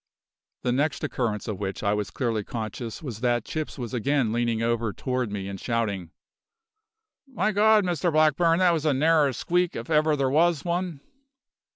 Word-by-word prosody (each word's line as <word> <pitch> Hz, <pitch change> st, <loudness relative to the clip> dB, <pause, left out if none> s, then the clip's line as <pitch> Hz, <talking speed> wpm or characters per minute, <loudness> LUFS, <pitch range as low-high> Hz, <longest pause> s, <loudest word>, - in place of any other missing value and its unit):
The 125 Hz, -, +1 dB
next 140 Hz, +4 st, 0 dB
occurrence 110 Hz, -5 st, -2 dB
of 105 Hz, -4 st, -4 dB
which 100 Hz, 0 st, -4 dB
I 100 Hz, 0 st, +2 dB
was 105 Hz, -1 st, -2 dB
clearly 115 Hz, -5 st, -2 dB
conscious 115 Hz, +4 st, -6 dB
was 120 Hz, -7 st, -6 dB
that 120 Hz, -1 st, 0 dB
Chips 155 Hz, -1 st, -4 dB
was 120 Hz, -3 st, -6 dB
again 125 Hz, -1 st, +1 dB
leaning 115 Hz, -1 st, 0 dB
over 115 Hz, -1 st, 0 dB
toward 125 Hz, -4 st, -2 dB
me 100 Hz, -2 st, -4 dB
and 100 Hz, -1 st, -6 dB
shouting: 105 Hz, -7 st, -2 dB, 1.2 s
"My 215 Hz, -6 st, 0 dB
God! 215 Hz, +1 st, +4 dB
Mr 175 Hz, -1 st, 0 dB
Blackburn, 155 Hz, +2 st, +3 dB
that 180 Hz, -1 st, +4 dB
was 160 Hz, -3 st, -1 dB
a 145 Hz, -, +3 dB
narrer 150 Hz, 0 st, +3 dB
squeak, 175 Hz, +7 st, 0 dB
if 115 Hz, +6 st, -6 dB
ever 155 Hz, 0 st, +3 dB
there 135 Hz, -2 st, +1 dB
was 165 Hz, +1 st, +2 dB
one! 175 Hz, -4 st, -2 dB
130 Hz, 175 wpm, -26 LUFS, 115-165 Hz, 1.2 s, God